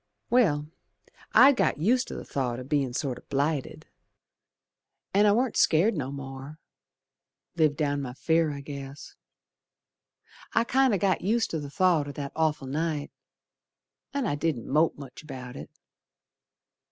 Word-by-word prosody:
Well, 170 -13 +3 0.7
I'd 275 +2 +8
got - - +2
used 240 - +2
to - - -6
th' - - -18
thought 125 -3 -2
o' - - -6
bein' 140 -1 0
sort 130 0 -3
o' - - -25
blighted, 140 0 -1 1.3
An' 205 +2 +5
I - - +6
warn't 240 +3 +1
scared 185 +8 +4
no 135 -4 -3
more. 135 +2 -8 1.0
Lived 155 -3 +2
down 145 -2 0
my 125 -2 -6
fear, 160 +3 +1
I 140 -1 -6
guess. 140 0 -9 1.4
I'd 230 +1 +1
kinder 260 -5 +3
got 190 -1 +1
used 225 +4 +1
to 160 - -2
th' 145 -1 -7
thought 170 -3 +2
o' - - -5
that 140 0 -5
awful 155 -3 0
night, 150 +1 -2 1.0
And 280 -5 -1
I - - 0
didn't 145 -5 -2
mope 155 +4 +2
much 140 -3 -10
about 130 -5 -9
it. - - -8
150 Hz, 150 wpm, -27 LUFS, 140-185 Hz, 1.4 s, I'd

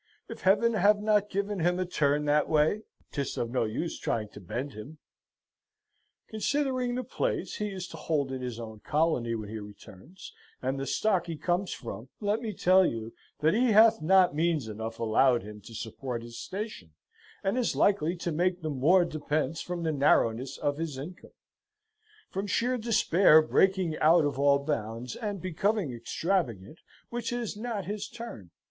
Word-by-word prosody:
If - - -9
Heaven 210 +5 +4
have 205 0 +4
not 210 -1 +2
given 200 0 -2
him 175 +2 +2
a 185 - -1
turn 150 -4 +1
that 150 +1 +2
way, 155 +7 +2 0.3
'tis 140 -3 -3
of 115 -1 -2
no 125 -2 +1
use 115 +10 -3
trying 110 -2 -2
to 105 - -12
bend 120 +9 -5
him. 120 +9 -10 1.3
"Considering 255 +2 -1
the 255 - -2
place - - -2
he 210 - -2
is 185 -2 -6
to 165 - -9
hold 150 -3 -1
in 130 -1 -4
his 125 -2 -5
own 110 -2 -8
colony 145 -5 0
when 110 -2 -5
he 110 0 -5
returns, 105 - -12 0.3
and 130 +1 -2
the 135 - -3
stock 190 -6 +1
he 165 -2 -4
comes 180 +4 -1
from, 120 +1 -7
let 210 +1 0
me 225 -3 -3
tell 185 -1 +4
you, 115 -7 -2 0.3
that 155 +2 +4
he 235 0 +3
hath 225 +1 +6
not 185 +1 +5
means 155 -4 0
enough 110 +1 -5
allowed 115 +2 +3
him 105 0 -10
to 115 - -10
support 115 +2 -5
his 115 0 -9
station, 190 - -6 0.5
and 195 +3 0
is 250 -2 0
likely 180 -4 +2
to 170 0 -3
make 180 +2 0
the 155 - -2
more 165 +7 +4
depence 155 -1 -2
from 175 -1 -4
the 160 - +1
narrowness 135 -2 +2
of 145 0 -1
his 160 -5 -3
income 170 +7 -9 1.0
from 195 +2 -3
sheer 245 +6 +1
despair 200 -8 +5
breaking 185 +1 +2
out 160 0 +5
of 140 -2 -2
all 140 0 +5
bounds, 120 -4 -3
and 205 -4 -4
becoming 185 - 0
extravagant, 120 - -2 0.3
which 240 0 -3
is 240 -3 -3
not 215 -3 -4
his 205 +2 -4
turn. 230 - -9
160 Hz, 175 wpm, -29 LUFS, 125-200 Hz, 1.3 s, hath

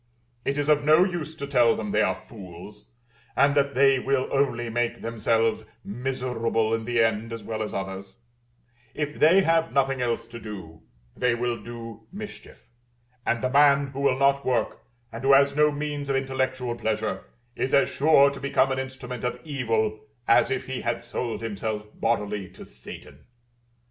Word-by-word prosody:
It 140 +1 0
is 145 0 -1
of 150 -1 +3
no 155 +4 +6
use 175 -4 -3
to 140 - -5
tell 125 -4 +4
them 105 -2 -4
they 105 - +2
are 95 -3 +2
fools, 95 0 -12 0.5
and 140 +1 +4
that 140 -1 +1
they 135 0 +5
will 135 0 0
only 130 -4 0
make 120 +1 -2
themselves 115 0 0 0.2
miserable 115 -1 -1
in 115 0 -1
the 120 0 0
end 115 0 -1
as 115 -1 -6
well 110 -1 -4
as 105 - -3
others: 95 +1 -6 0.8
if 150 -1 -3
they 170 +6 +6
have 165 -1 +2
nothing 135 -1 +1
else 120 -1 -1
to 115 0 -10
do, 95 -8 -9 0.3
they 125 -1 +1
will 120 0 -1
do 115 -2 -9
mischief; 205 +1 -10 0.6
and 115 +1 0
the 130 - +1
man 140 0 +4
who 135 - -5
will 140 -2 +2
not 140 0 +3
work, 120 -4 0 0.3
and 115 +2 -7
who 135 +1 +5
has 140 +1 +5
no 150 0 +4
means 145 -1 -4
of 135 - +1
intellectual 130 -2 -1
pleasure, 110 -4 -2 0.3
is 130 - -2
as 140 - +4
sure 140 -1 +4
to 140 - -8
become 135 -1 +1
an 130 - -1
instrument 130 -2 -6
of 125 - -2
evil 115 -8 -1 0.3
as 115 - +5
if 130 -1 -2
he 130 -1 -4
had 120 0 -2
sold 120 0 -4
himself 105 0 -3
bodily 105 -4 -1
to 95 - -12
Satan. - - -12
125 Hz, 175 wpm, -25 LUFS, 115-140 Hz, 0.8 s, no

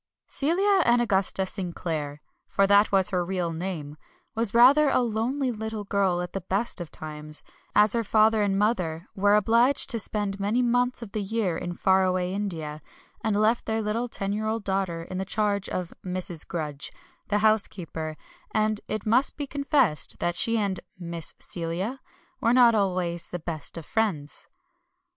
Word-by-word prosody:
Celia 375 +7 +2
Anagusta 200 -6 +2
Sinclair 165 -6 -3 0.2
for 195 - +2
that 200 +1 +5
was 195 0 +3
her 180 -2 +1
real 175 -2 -2
name 160 -4 -5 0.4
was 225 -2 +2
rather 270 +6 +6
a - - +3
lonely 245 +4 -1
little 220 -1 -4
girl 195 -3 +1
at 180 - -7
the 195 - -3
best 195 +2 0
of 170 - -6
times, 155 0 -6 0.3
as 210 -1 +6
her 230 -1 +1
father 220 +1 +4
and 200 -1 +1
mother 180 -6 0
were 205 +1 +3
obliged 235 +7 +3
to 230 - -1
spend 205 -2 -2
many 215 +5 +1
months 245 0 +1
of 210 - -10
the 215 - -2
year 200 -3 -1
in 175 +1 -4
far 190 +1 +3
away 185 0 0
India, 160 -7 -4 0.4
and 220 -2 +1
left 215 +3 +2
their 220 0 0
little 220 +3 -1
ten 200 -3 -3
year 215 +1 -2
old 220 0 -2
daughter 190 -4 -1
in 185 +2 -6
the - - -1
charge 200 0 -1
of 180 -1 -4
Mrs. 180 -3 -3
Grudge, 150 -4 -4 0.4
the 205 - +1
housekeeper; 170 -7 -1 0.4
and 215 -1 +1
it 215 -1 -3
must 240 +5 +3
be 290 - -2
confessed 275 - +1
that 175 - 0
she 230 +5 +3
and 200 -3 0 0.2
"Miss 170 -2 -4
Celia" 180 +9 -3 0.4
were 230 - +2
not 245 -2 +6
always 180 -5 0
the 180 - -4
best 165 -1 -6
of 165 - -7
friends. 185 -10 -2
200 Hz, 170 wpm, -26 LUFS, 175-225 Hz, 0.4 s, rather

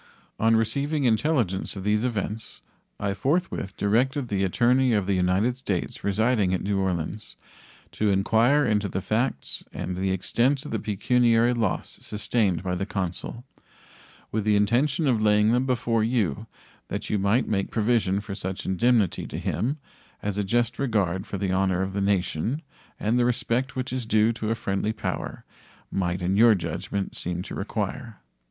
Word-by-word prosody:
On 115 +1 +4
receiving 140 +7 0
intelligence 115 - +1
of 95 - -6
these 105 +2 +1
events 110 -2 -3 0.4
I 100 -1 -1
forthwith 130 - -1
directed 125 +6 +1
the 100 -1 0
attorney 125 +6 +3
of 105 -3 +1
the 100 - +1
United 95 +7 +1
States 95 -9 -3
residing 105 -1 +2
at - - -4
New 100 0 0
Orleans 95 +2 -3 0.6
to 105 - 0
inquire 115 +9 +3
into 105 -2 +1
the 95 - -2
facts 110 - -1
and 90 - -4
the 95 +1 -1
extent 120 - +1
of - - -6
the 110 - -1
pecuniary 115 +3 +2
loss 115 -5 -2
sustained 105 -4 0
by 90 -1 -2
the 95 +2 -2
consul, 95 +4 -4 0.9
with 110 -1 -1
the 105 0 +3
intention 130 +10 +2
of 120 -6 +2
laying 105 0 +4
them 125 +2 +2
before 115 -3 +1
you, 110 - 0 0.4
that - - -4
you 105 - +1
might 100 +6 +2
make 100 -2 0
provision 105 -4 +1
for 105 -1 -7
such 95 -1 -5
indemnity 110 0 +2
to - - -6
him 135 +6 -1 0.5
as 105 -1 -2
a - - +1
just 120 +4 0
regard 100 -7 0
for 100 - -4
the 95 -1 -1
honor 95 -1 +1
of 95 0 -4
the 100 - -1
nation 100 - 0 0.4
and 115 +4 +1
the - - +4
respect 125 +1 0
which 130 0 -3
is 125 -3 -3
due 110 +1 +3
to 110 -1 -3
a 115 - +1
friendly 105 0 -1
power 105 - -4 0.5
might, 90 -1 -1
in 95 +2 +1
your 115 0 +7
judgment, 95 +2 -3
seem 90 0 -3
to - - -8
require. 110 +3 -4
105 Hz, 170 wpm, -25 LUFS, 95-120 Hz, 0.9 s, your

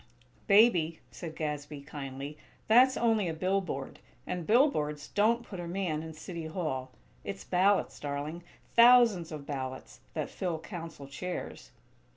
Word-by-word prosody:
"Baby," 180 -7 +5
said 165 -3 -7
Gadsby, 150 -2 -4
kindly, 140 0 -7 0.3
"that's 255 +4 +6
only 225 -5 +2
a 165 - -2
billboard, 185 -6 -2 0.3
and 180 -3 -4
billboards 155 - +2
don't 230 +3 +2
put 190 -5 -8
a 175 - -5
man 170 -4 -2
in 160 0 -7
City 165 0 -6
Hall. 155 -6 -3 0.3
It's 100 0 -6
ballots, 190 - +2
darling; 145 +4 -4 0.3
thousands 235 -8 +6
of 150 -2 -7
ballots, 130 - -6 0.2
that - - -3
fill 175 -3 -2
Council 165 -4 -8
chairs." 175 +7 -6
165 Hz, 135 wpm, -30 LUFS, 145-195 Hz, 0.3 s, that's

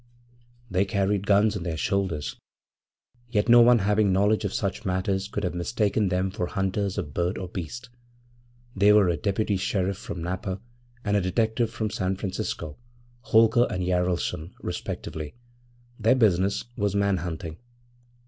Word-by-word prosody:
They 90 +2 +3
carried 100 -1 0
guns 105 +1 +4
on 100 - -3
their 85 -2 -3
shoulders, 95 -5 -1 0.9
yet 105 -2 +1
no 120 0 +8
one 120 +1 +7
having 105 0 +2
knowledge 100 +4 +2
of 100 - -1
such 100 +1 -2
matters 95 0 -1
could 105 0 -4
have 90 - -1
mistaken 100 +2 0
them 95 +1 0
for 95 -3 -2
hunters 95 +1 -1
of 75 -8 -4
bird 85 +2 -1
or 95 - -4
beast. 95 +8 -7 0.8
They 100 +1 +5
were 105 -4 +5
a 85 - +1
deputy 100 +4 0
sheriff 95 0 -1
from 85 -6 -6
Napa 95 +2 -3 0.5
and 105 0 +1
a 100 - +3
detective 110 +5 0
from 110 -2 -3
San 95 -2 -1
Francisco 95 -6 -4 0.5
Holker 115 +2 +5
and 90 - -2
Jaralson, 90 -1 -1
respectively. 80 -2 -5 0.6
Their 115 +4 +4
business 100 -5 +2
was 100 -2 -1
man 100 -1 +2
hunting. 80 -1 -5
100 Hz, 150 wpm, -26 LUFS, 90-105 Hz, 0.9 s, no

